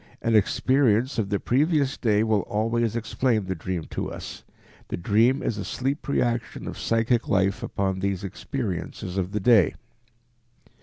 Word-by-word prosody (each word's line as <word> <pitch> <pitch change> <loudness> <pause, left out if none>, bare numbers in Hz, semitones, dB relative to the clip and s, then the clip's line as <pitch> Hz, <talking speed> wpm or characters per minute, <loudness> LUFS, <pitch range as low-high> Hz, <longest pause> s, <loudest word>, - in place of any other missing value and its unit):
An 115 -1 +1
experience 125 +3 +2
of 100 -3 -1
the 100 -1 0
previous 145 +1 +1
day 110 -3 +2
will 110 -2 +2
always 115 +1 0
explain 115 -1 0
the 95 - -2
dream 90 0 -4
to - - -3
us. - - -8 0.4
The - - -4
dream 115 +9 +2
is 110 - -2
a - - -3
sleep 135 +7 -3
reaction 120 -5 -1
of - - -6
psychic 115 +1 +1
life 95 0 +1
upon 95 -1 -2
these 95 0 -2
experiences 95 -3 -4
of 95 0 -2
the 105 - -1
day. 105 -4 +4
110 Hz, 155 wpm, -25 LUFS, 100-120 Hz, 0.4 s, day